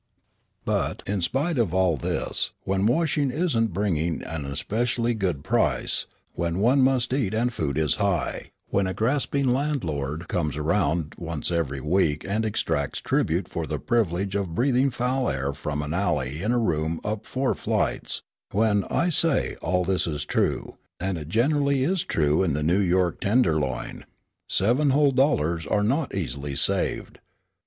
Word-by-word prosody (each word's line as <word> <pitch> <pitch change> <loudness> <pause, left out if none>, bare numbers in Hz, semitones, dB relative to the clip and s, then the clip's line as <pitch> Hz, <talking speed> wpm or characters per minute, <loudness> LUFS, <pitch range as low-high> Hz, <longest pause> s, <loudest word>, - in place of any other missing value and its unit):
But - - -1
in 100 -1 -1
spite 135 - 0
of 95 -7 +1
all 95 -3 +3
this, 65 - -1
when 95 +1 +1
washing 145 +1 +1
isn't 125 - 0
bringing 85 -4 -1
an 80 -3 -5
especially 115 - -1
good 90 -10 -2
price; - - +1 0.3
when 85 0 -2
one 125 +7 +4
must 130 -2 +2
eat 115 -7 0
and 120 +2 +1
food 75 -8 -2
is 80 -2 +1
high; 95 -8 -1 0.2
when 100 -1 +1
a 95 - -3
grasping 135 +3 +1
landlord 85 - -1
comes 75 -5 -1
around 80 -1 0
once 85 -1 -4
every 75 -5 -1
week 75 -1 +1
and 110 +3 0
exacts 70 -9 -1
tribute 85 +3 0
for 80 -2 -4
the - - -2
privilege 100 -4 0
of 95 -5 -2
breathing 130 +3 +3
foul 125 +1 0
air 70 +1 -2
from 75 +1 -3
an 75 +1 -3
alley 75 -6 -1
in 105 +4 0
a 125 - +2
room 80 -7 0
up 105 0 -3
four 130 0 0
flights; - - -1 0.3
when, 105 -1 +2
I 175 - +1
say, 165 -3 +2
all 90 +2 +1
this 95 0 0
is 75 -3 -3
true, - - -1 0.2
and 95 +1 -1
it 75 0 -8
generally 140 - +2
is 180 +4 +1
true 75 0 +1
in 85 -6 +1
the 75 +1 -1
New 85 +6 +3
York 90 -2 +1
tenderloin, 80 - 0 0.4
seven 125 +9 +2
whole 140 +1 +4
dollars 85 - +1
are 105 - +1
not 135 +5 0
easily 70 -5 -3
saved. - - 0
95 Hz, 160 wpm, -25 LUFS, 80-125 Hz, 0.4 s, one